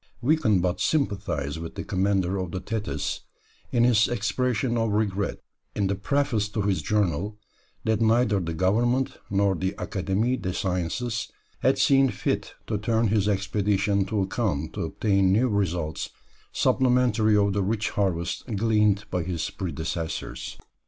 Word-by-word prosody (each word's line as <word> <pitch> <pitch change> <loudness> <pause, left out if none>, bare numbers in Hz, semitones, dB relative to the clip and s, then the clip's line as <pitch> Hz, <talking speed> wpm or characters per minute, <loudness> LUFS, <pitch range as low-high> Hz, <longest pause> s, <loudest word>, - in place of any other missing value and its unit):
We 150 +6 +3
can 110 - +2
but 90 0 -1
sympathize 95 - -1
with 85 0 -7
the - - -4
commander 95 0 0
of 90 -2 -3
the 95 - -4
Thetis, 105 +3 -3 0.5
in 120 - +3
his 115 -2 +4
expression 120 +1 0
of 115 -1 +1
regret, 100 -2 -1 0.3
in 100 - +1
the 95 - +1
preface 110 0 0
to 105 -1 -2
his 95 -5 +1
journal, 105 +1 0 0.5
that 110 0 +1
neither 115 -2 +3
the 85 -2 -3
Government 120 +9 +1
nor 100 0 +2
the 95 +2 -2
Académie 105 +7 -1
des 90 - -2
Sciences 105 +8 -2 0.3
had 135 +2 +3
seen 135 0 +4
fit - - -2
to 105 -2 -2
turn 110 +1 +1
his 105 -1 +2
expedition 100 0 +1
to 105 0 -1
account 95 - -2
to - - -2
obtain 100 -3 +2
new 115 +6 +3
results 90 -6 -1 0.4
supplementary 120 -4 +3
of 100 -1 +2
the 100 - +1
rich 105 +2 -1
harvest 90 -2 -1
gleaned 105 -1 +2
by 90 - 0
his 85 -1 -2
predecessors. 80 -2 -4
100 Hz, 150 wpm, -26 LUFS, 95-115 Hz, 0.5 s, his